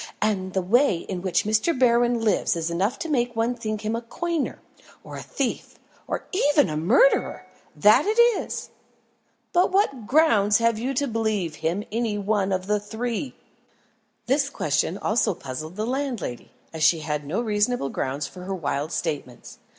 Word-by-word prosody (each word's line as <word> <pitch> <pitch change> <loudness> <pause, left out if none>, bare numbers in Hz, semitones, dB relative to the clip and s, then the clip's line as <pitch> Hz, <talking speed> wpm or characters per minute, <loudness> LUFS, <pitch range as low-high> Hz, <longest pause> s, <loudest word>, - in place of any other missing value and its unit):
"And 190 -3 -1
the 190 - 0
way 235 +1 +3
in 180 +1 -6
which 185 -1 +1
Mr. 220 +9 +1
Berwin 240 -1 +3
lives 215 -5 +1
is 165 0 -2
enough 200 +10 0
to 335 - -5
make 245 -5 0
one 230 +2 +1
think 215 -3 -4
him 220 +1 -2
a 230 - -3
coiner, 330 +6 -3 0.5
or - - -9
a - - -6
thief, - - -4 0.3
or - - -3
even 295 - +3
a - - -3
murderer 225 - +3 0.3
that 215 - +5
it 435 +2 +1
is!" 475 -2 +2 0.8
"But 360 +1 +3
what 275 - +1
grounds 220 -9 +4
have 230 -1 +1
you 260 +4 -2
to 285 +3 0
believe 215 -9 -1
him 170 +6 -1
any 225 -2 -1
one 200 -1 0
of 185 -1 -1
the 210 +1 +1
three?" 230 +5 -4 0.9
This 280 +2 +1
question 155 - -1
also 210 -3 +1
puzzled 155 +2 -7
the 215 +2 -2
landlady, 250 - -3 0.2
as 160 - -6
she 155 +1 +4
had 150 -1 -3
no 155 +9 -2
reasonable 215 - 0
grounds 135 +2 -3
for 180 +5 -9
her 195 0 -3
wild 150 -2 -2
statements. 145 -7 -5
215 Hz, 170 wpm, -24 LUFS, 180-245 Hz, 0.9 s, that